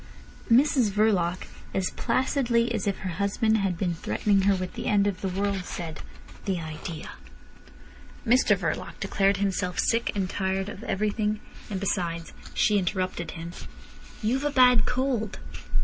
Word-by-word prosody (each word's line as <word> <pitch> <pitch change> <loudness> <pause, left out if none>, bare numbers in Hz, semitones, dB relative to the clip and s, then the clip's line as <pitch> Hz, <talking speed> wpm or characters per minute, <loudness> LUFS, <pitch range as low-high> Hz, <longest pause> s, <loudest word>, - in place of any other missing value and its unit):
Mrs 255 -1 +5
Verloc, 195 -4 +2 0.3
as 190 -1 0
placidly 235 -1 +1
as 210 -3 -2
if 200 - 0
her 190 - -3
husband 220 +2 +2
had 190 -3 0
been 175 -1 0
threatening 195 +4 +1
her 200 - +4
with 185 -1 -4
the - - -5
end 205 -1 +3
of 200 -3 -1
the 195 - -1
world, 195 0 -1
said: 165 -3 -6 0.4
"The 190 -3 0
idea!" 160 0 -6 1.1
Mr 250 +2 +4
Verloc - - -3
declared 195 -1 +2
himself 195 -2 -1
sick 235 +1 +2
and 195 -2 0
tired 190 +1 -1
of 210 +1 -8
everything, 210 +1 0 0.3
and 195 -3 -2
besides—She 180 +2 0
interrupted 185 -2 -2
him. 165 +1 -6 0.7
"You've 255 +6 +1
a 295 - +2
bad 250 -5 +5
cold." 250 -5 -1
200 Hz, 145 wpm, -27 LUFS, 185-220 Hz, 1.1 s, Mrs